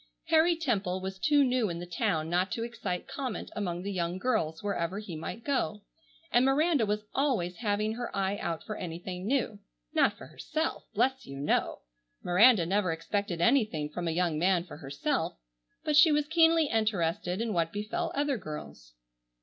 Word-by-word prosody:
Harry 325 +2 +5
Temple 205 - -1
was 190 0 -6
too 295 +2 +4
new 250 -5 +1
in 170 - -4
the 175 - -6
town 160 -2 -1
not 180 +3 0
to 230 - -2
excite 200 -6 -4
comment 265 -3 -5
among 180 -4 -3
the 200 - -3
young 175 -1 -2
girls 175 -8 -1
wherever 190 -2 -1
he 205 -5 -6
might 165 +8 -6
go, 245 -7 -1 0.5
and 240 - +5
Miranda 280 -2 +3
was 210 +1 -1
always 230 -11 0
having 215 -1 0
her 240 +1 -4
eye 195 0 +1
out 165 -4 -3
for 215 - -5
anything 180 +2 -5
new. 240 -5 0 0.3
Not - - +3
for - - -10
herself! - - -3
Bless 265 0 +1
you! 135 0 -7
no! 145 - 0 0.4
Miranda 200 +1 +6
never 190 0 +1
expected 175 +2 -2
anything 215 - +2
from 175 +2 -3
a - - +1
young 165 -2 0
man 180 0 +3
for 175 - -11
herself, 140 - -2 0.5
but 300 - +1
she 305 +2 +8
was 295 0 +2
keenly 325 0 +5
interested 195 - 0
in 230 -1 -1
what 165 -2 +1
befell 275 +13 -3
other 280 -3 0
girls. 150 - -8
205 Hz, 175 wpm, -30 LUFS, 175-255 Hz, 0.5 s, she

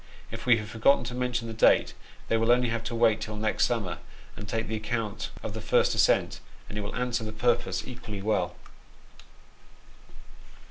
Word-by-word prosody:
If - - -7
we 120 -2 +6
have 110 -1 -5
forgotten 115 +5 +3
to 120 - -5
mention 125 -2 -2
the 115 - -5
date, 110 - +4 0.3
they - - -1
have 115 +1 +1
only 120 -1 +4
to 115 +1 -3
wait 115 -2 +3
till 110 -1 -5
next 110 +1 +1
summer, 100 -8 -2 0.4
and 105 - -8
take 115 +1 -2
the 110 - -2
account 110 -1 -3
of - - -4
the - - -5
first - - +3
ascent, - - +2 0.3
and - - -7
it 105 - -2
will 100 - -5
answer 125 -2 -1
the 110 - -4
purpose 120 +2 0
equally 105 -5 -7
well. 110 +1 0
115 Hz, 180 wpm, -28 LUFS, 110-120 Hz, 0.4 s, we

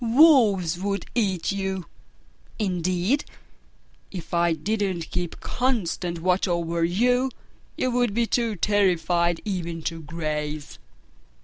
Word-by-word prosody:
Wolves 225 - +5
would 200 +1 -2
eat 195 -7 0
you! 190 -2 -2 0.7
Indeed, 185 - 0 0.9
if 180 -3 -8
I 170 -1 +3
didn't 190 0 -2
keep 175 -2 -3
constant 185 -9 -1
watch 185 +2 +2
over 170 -1 0
you, 245 +9 +2 0.5
you 255 - 0
would 245 -4 +1
be 235 0 +2
too 230 -1 0
terrified 175 -3 +2
even 170 -5 -3
to 165 0 -3
graze!" 150 -1 -4
185 Hz, 110 wpm, -25 LUFS, 170-220 Hz, 0.9 s, Wolves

